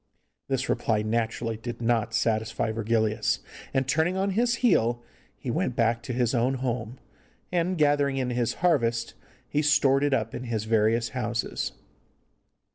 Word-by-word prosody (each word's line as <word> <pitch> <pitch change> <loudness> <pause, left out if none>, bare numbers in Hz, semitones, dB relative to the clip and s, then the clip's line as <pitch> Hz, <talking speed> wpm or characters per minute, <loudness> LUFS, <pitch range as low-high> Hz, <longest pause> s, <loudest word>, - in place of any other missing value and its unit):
This 135 -1 -1
reply 105 -2 +1
naturally 115 0 -1
did 120 +1 -6
not 115 -1 0
satisfy 110 0 0
Virgilius, 110 0 +1 0.3
and, 135 -1 0
turning 160 +7 +1
on 195 +1 +1
his 235 +4 +2
heel, 120 - +3 0.3
he - - -4
went - - -1
back 115 0 +2
to - - -6
his 120 -1 +1
own 125 +2 +2
home, 125 -2 -3 0.5
and, 180 +1 0
gathering 145 -2 +2
in 125 -2 -1
his 120 -1 0
harvest, 120 -9 +2 0.3
he 150 - 0
stored 140 -2 +3
it 145 - +2
up 115 -4 0
in 125 - -5
his 115 -3 -2
various 110 +1 +2
houses. 115 -2 -2
120 Hz, 150 wpm, -27 LUFS, 115-135 Hz, 0.5 s, heel